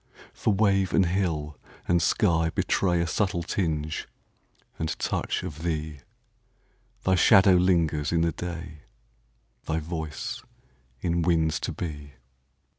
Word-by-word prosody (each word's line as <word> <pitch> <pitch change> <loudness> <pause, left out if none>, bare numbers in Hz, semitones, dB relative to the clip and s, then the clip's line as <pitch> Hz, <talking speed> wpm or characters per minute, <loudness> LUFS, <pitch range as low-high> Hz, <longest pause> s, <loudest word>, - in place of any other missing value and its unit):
For - - 0
wave 95 -2 +2
and 95 - +4
hill 85 -5 -1 0.3
and 85 -1 +3
sky 80 -3 +2
betrayA 85 +1 +1
subtle 85 +1 -1
tinge 80 -4 -2 0.7
and 80 -2 -2
touch - - -2
of 80 -4 -7
thee; 80 -3 -3 1.0
Thy 95 - +2
shadow 95 +1 +6
lingers 85 -5 +2
in 85 -1 +2
the 85 0 +2
day, 85 -2 -7 0.9
Thy 80 - 0
voice 80 -1 -5 0.6
in 85 0 0
winds 80 -2 +2
to - - -3
be. 75 -4 -6
85 Hz, 115 wpm, -26 LUFS, 80-90 Hz, 1.0 s, shadow